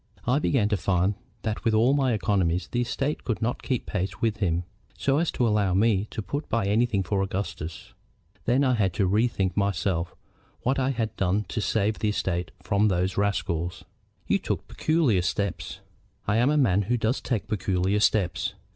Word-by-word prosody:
I 125 +4 +3
began 130 -8 +2
to 105 - +1
find 90 +2 +1 0.3
that 110 -1 -2
with 115 -2 +2
all 120 +5 +4
my 135 -4 +2
economies 95 -4 +1
the 120 - -1
estate 135 +5 -2
could 115 - -2
not 120 +2 -1
keep 130 -4 -2
pace 95 -1 -3
with 115 -3 0
him, 90 -4 0 0.3
so 140 +1 +2
as 170 - +1
to 120 - +1
allow 105 -4 +2
me 105 0 +2
to 110 - -5
put 140 - -4
by 115 -2 +1
anything 105 0 +2
for 95 +2 0
Augustus. 95 -4 -4 0.5
Then 130 +4 +3
I 130 -2 +3
had 100 -6 +1
to 95 - +1
bethink 100 -2 +1
myself 95 -3 0 0.5
what 135 +3 +1
I 130 0 +1
had 115 -5 -2
to 90 -2 +2
do 105 +1 0
to 110 - -2
save 105 0 0
the 105 - +1
estate 90 -4 -1
from 100 +2 +2
those 90 -1 0
rascals." 90 -4 -1 0.4
"You - - +2
took - - -3
peculiar 155 - +2
steps." 100 +1 -3 0.5
"I 100 +2 +2
am 120 +4 +4
a 150 - +2
man 105 -9 +3
who 125 - +3
does 115 +3 0
take 120 -6 -2
peculiar 95 -2 0
steps. 100 -4 +1
105 Hz, 190 wpm, -26 LUFS, 95-120 Hz, 0.5 s, all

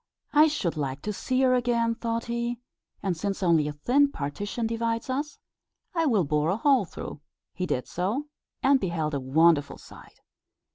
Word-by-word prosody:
"I 300 +1 +7
should 205 - -2
like 140 -1 -3
to 210 - -2
see 255 +5 -1
her 255 -1 +4
again," 235 -2 +2
thought 230 0 -3
he; 235 0 -2 0.5
"and 190 -3 0
since 195 +3 -3
only 165 -4 +3
a - - -2
thin 275 - +2
partition 205 - -3
divides 230 +2 -1
us, 285 +2 -3 0.6
I 330 -2 +1
will 215 -9 +3
bore 150 +1 +1
a 190 - +1
hole 270 -4 +3
through." 150 - -8 0.3
He 180 +2 -3
did 125 - -2
so, 205 - -2 0.4
and 275 0 +5
beheld 165 -6 -2
a 140 - 0
wonderful 145 +2 +3
sight. - - -15
215 Hz, 175 wpm, -27 LUFS, 160-250 Hz, 0.6 s, I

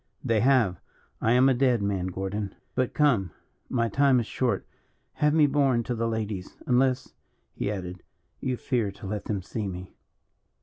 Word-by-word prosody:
"They 115 -2 +2
have. 115 -7 +3 0.4
I 115 - +3
am 125 +2 +6
a 135 - +5
dead 125 -4 +2
man, 95 -3 -1
Gordon. 95 +2 -4 0.2
But 130 -1 -1
come, 125 -12 +3 0.4
my 115 -2 +1
time 135 +1 +4
is 115 - -1
short; 125 +2 -1 0.5
have 150 0 +2
me 155 -1 +5
borne 135 -4 +2
to 125 - -2
the 115 0 -1
ladies 105 -4 -4
unless," 130 +1 +2 0.4
he - - -2
added, 90 -3 -5 0.4
"you 130 -2 -2
fear 120 -6 0
to - - -11
let 105 +1 -4
them 100 -4 -2
see 105 +2 -4
me." 90 0 -7
115 Hz, 170 wpm, -27 LUFS, 100-130 Hz, 0.5 s, am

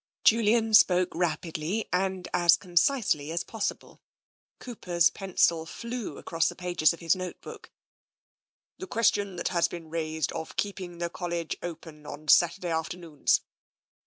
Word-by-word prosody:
" - - -71
Julian 225 0 +3
spoke 185 -3 +6
rapidly, 170 +3 -2
and 190 0 -1
as 175 -1 +5
concisely 175 - +1
as 170 +1 -1
possible. 220 +1 -5 0.6
Cooper's 175 -8 0
pencil 170 -4 +1
flew 235 +4 -6
across 165 -1 0
the - - -8
pages 175 -4 +2
of 170 - -8
his 170 +3 +3
note 185 -1 -6
book. - - -11 0.6
" - - -73
The 375 - -6
question 205 - +1
has 170 -1 +2
been 165 -2 -9
raised 160 -1 -2
of 160 -1 -6
keeping 185 -4 -4
the 170 0 -3
College 170 -2 -3
open 160 -3 -8
on 150 +1 -8
Saturday 175 0 +4
afternoons. 160 -1 0
175 Hz, 140 wpm, -28 LUFS, 165-195 Hz, 0.6 s, spoke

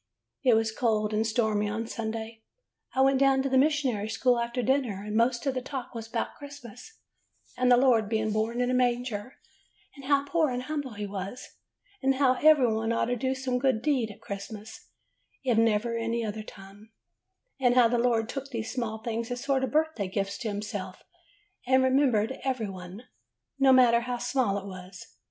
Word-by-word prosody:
"It 250 -4 +5
was 225 0 +1
cold 220 -2 0
and 220 +1 +1
stormy 220 -2 0
on 220 +2 -3
Sunday. 225 0 -5 0.5
I 265 - +3
went 270 0 +4
down 270 -1 +4
to 275 - -1
the 265 - +2
mission 265 -8 +1
school 245 +3 +2
after 235 +1 -2
dinner, 245 -6 0
and 210 0 -4
most 235 +3 +2
of 275 - +1
the 255 - -2
talk 260 -1 -6
was 225 -1 -6
'bout 225 0 -3
Christmas, 285 - -11 0.6
and 250 0 +2
the 245 - +7
Lord 240 -5 +3
being 220 -1 0
born 220 +3 -1
in 250 0 +1
a - - 0
manger, 245 -2 -1 0.6
and 275 -2 -12
how 280 0 +2
poor 315 0 +1
and 250 0 -3
humble 285 -3 -4
he 205 0 -5
was; 200 +4 -6 0.5
and 270 0 +2
how 260 -1 +4
that 255 - -8
every 305 -4 +7
one 225 +1 -1
ought 230 - +1
to - - 0
do 260 +2 -1
some 260 -1 -2
good 255 -4 +1
deed 260 -7 +1
at 210 +1 -12
Christmas, 215 - -8 0.6
if 250 -3 +2
never 230 +1 +2
any 230 0 -1
other 215 0 -4
time; 205 +1 -13 0.7
and 245 -2 +3
how 245 -2 +6
the 240 +1 0
Lord 230 -2 +2
took 275 +2 -6
these 230 -3 -5 0.3
things 230 0 -3
as 245 +1 -4
sort 275 -1 +1
of 265 - 0
birthday 310 -10 0
gifts 200 +1 -3
to 230 - -4
him 205 0 -3
self, 190 -3 -6 0.6
and 260 0 +4
remembered 260 -3 +2
every 255 -5 -1
one, 185 +4 -9 0.6
no 270 -1 +6
matter 245 -2 +6
how 245 +1 -3
small 245 -4 0
it 200 - -6
was. 185 -1 -10
235 Hz, 195 wpm, -28 LUFS, 215-260 Hz, 0.7 s, the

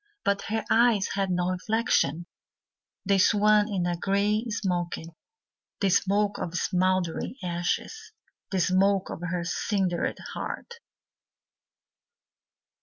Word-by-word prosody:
But 200 0 +1
her 220 +1 -2
eyes 230 -3 +3
had 195 -1 -1
no 180 0 0
reflection, 185 - 0 0.8
They 195 0 +3
swam 210 +1 +4
in 190 -5 -1
a 175 0 0
grey 200 +5 +1
smoke, 180 -5 -1 0.8
The 195 - +2
smoke 205 +2 +2
of 175 0 -4
smouldering 185 +2 0
ashes, 180 - -3 0.4
The 190 - -1
smoke 190 +2 +2
of - - -7
her 175 0 -2
cindered 180 0 -1 0.2
heart. 475 0 -6
195 Hz, 110 wpm, -27 LUFS, 180-210 Hz, 0.8 s, swam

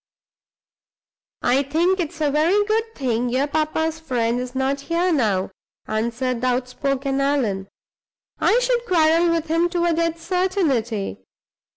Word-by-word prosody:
"I 255 +3 +3
think 335 +7 +1
it's 320 -1 -4
a 295 -2 +2
very 340 +8 +3
good 450 +1 -1
thing 245 -3 -1
your 260 +3 +1
papa's 315 +1 -1
friend 245 -6 -1
is 250 +1 -6
not 270 +1 0
here 345 +4 0
now," 205 -10 +1 0.4
answered 235 +3 -2
the 255 - +1
outspoken 270 +2 -1
Allan; 235 -9 0 0.7
"I 465 - +3
should 485 -1 0
quarrel 335 0 +3
with 335 -1 0
him 330 +2 +1
to 345 -1 0
a 340 - +2
dead 335 0 0
certainty. 300 - -1
290 Hz, 140 wpm, -22 LUFS, 250-335 Hz, 0.7 s, I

